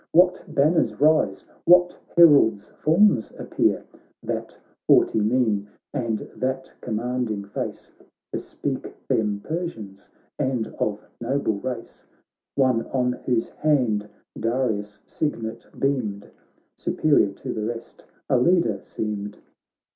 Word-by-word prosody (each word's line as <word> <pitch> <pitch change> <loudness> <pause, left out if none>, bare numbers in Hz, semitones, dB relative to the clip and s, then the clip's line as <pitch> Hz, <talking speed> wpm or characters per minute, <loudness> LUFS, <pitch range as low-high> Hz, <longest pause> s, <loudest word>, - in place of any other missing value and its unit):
What 180 +2 +5
banners 155 +4 +2
rise, 155 +2 +3 0.2
what 180 0 +6 0.2
heralds' 145 -11 +6
forms 165 - +3
appear? - - 0 0.4
That - - -4 0.3
haughty - - +5
mien, 105 -3 +1 0.2
and 115 -6 -2
that 130 +1 -3
commanding 115 -2 -2
face 100 - -6 0.4
Bespeak - - -4
them 105 -2 0
Persians, 115 - -5 0.3
and 130 -5 0
of 105 -1 0 0.2
noble 120 -4 0
race; 125 0 -6 0.5
One 130 -4 +2
on 125 -2 +1 0.2
whose 120 -3 +1
hand 120 -9 +1 0.3
Darius' 110 -3 -1
signet 115 -7 -3
beamed, 120 -8 -1 0.5
Superior 145 -10 +3
to - - -6
the 110 - -3
rest, 115 +1 -6 0.2
a 130 - +3
leader 125 - +3
seemed. 105 -1 -4
120 Hz, 105 wpm, -24 LUFS, 105-140 Hz, 0.5 s, what